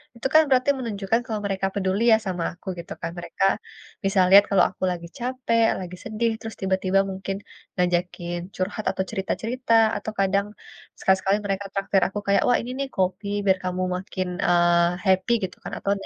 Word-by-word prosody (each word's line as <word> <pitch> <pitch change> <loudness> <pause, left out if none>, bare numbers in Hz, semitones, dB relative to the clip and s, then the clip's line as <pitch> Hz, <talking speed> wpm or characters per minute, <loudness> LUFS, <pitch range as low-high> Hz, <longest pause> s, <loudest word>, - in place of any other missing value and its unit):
itu 235 - -2
kan 315 - +8
berarti 255 +1 +3
menunjukkan 220 -2 -1
kalau 220 -4 -3
mereka 195 -1 -1
peduli 195 +2 0
ya, 220 - +7
sama 180 -2 -2
aku, 175 - -19
gitu 170 - -10
kan. 165 - -3
Mereka 195 - -1 0.6
bisa 195 0 +1
lihat 200 +2 +9
kalau 190 -3 +5
aku 185 - -10
lagi 170 -1 -5
capek, 245 -2 +1
lagi 180 -1 -7
sedih, 225 +1 -1
terus 225 -1 -7
tiba-tiba 190 0 +1
mungkin 195 +1 -4 0.4
ngajakin 175 -1 -1 0.2
curhat 200 +3 -3
atau 190 0 -2
cerita-cerita, 230 +5 -2 0.2
atau 215 +1 -5
kadang 195 +1 +2 0.5
sekali-sekali 190 +1 +2
mereka 200 0 -2
traktir 195 -1 +1
aku 200 +2 -4
kayak, 200 - +4
"Wah, 245 - +4
ini 245 - -6
nih 275 - -1
kopi 190 +2 -1 0.2
biar 190 -1 +4
kamu 185 0 -2
makin, 185 0 -4 0.2
eee, 175 0 +3
happy," 190 +4 +3
gitu 185 - -17
kan - - -6
atau 200 - -1
ne - - -9
195 Hz, 180 wpm, -24 LUFS, 185-215 Hz, 0.6 s, lihat